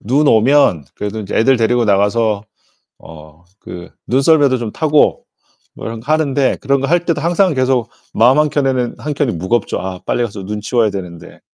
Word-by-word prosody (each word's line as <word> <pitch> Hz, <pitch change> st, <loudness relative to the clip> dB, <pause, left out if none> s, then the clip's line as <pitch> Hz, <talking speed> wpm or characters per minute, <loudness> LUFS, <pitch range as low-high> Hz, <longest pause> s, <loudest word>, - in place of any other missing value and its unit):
눈 140 Hz, +7 st, +1 dB
오면 115 Hz, -, +3 dB
그래도 105 Hz, +1 st, -5 dB
인제 100 Hz, -, -6 dB
애들 130 Hz, +4 st, +3 dB
데리고 120 Hz, +1 st, +1 dB
나가서 105 Hz, +1 st, +1 dB, 0.6 s
어 80 Hz, +1 st, -15 dB, 0.2 s
그 90 Hz, 0 st, -9 dB, 0.2 s
눈썰매도 135 Hz, 0 st, +2 dB
좀 115 Hz, -3 st, -5 dB
타고 155 Hz, +2 st, +1 dB, 0.5 s
뭐 -, -, -8 dB
이런 115 Hz, 0 st, -6 dB
거 125 Hz, +7 st, -4 dB
하는데 140 Hz, -3 st, +1 dB
그런 140 Hz, 0 st, 0 dB
거 135 Hz, -, -1 dB
할 175 Hz, +2 st, +1 dB
때도 165 Hz, -4 st, -1 dB
항상 175 Hz, +2 st, +1 dB
계속 130 Hz, -3 st, 0 dB, 0.2 s
마음 125 Hz, +5 st, +4 dB
한 150 Hz, 0 st, +2 dB
켠에는 130 Hz, -4 st, -1 dB
한 150 Hz, -, -4 dB
켠이 140 Hz, -4 st, 0 dB
무겁죠. 95 Hz, +7 st, -2 dB
'아, 95 Hz, 0 st, -6 dB
빨리 -, -, -1 dB
가서 100 Hz, -4 st, -6 dB
눈 105 Hz, +1 st, -5 dB
치워야 110 Hz, -1 st, 0 dB
되는데.' 90 Hz, -4 st, -9 dB
120 Hz, 345 characters per minute, -16 LUFS, 105-140 Hz, 0.6 s, 마음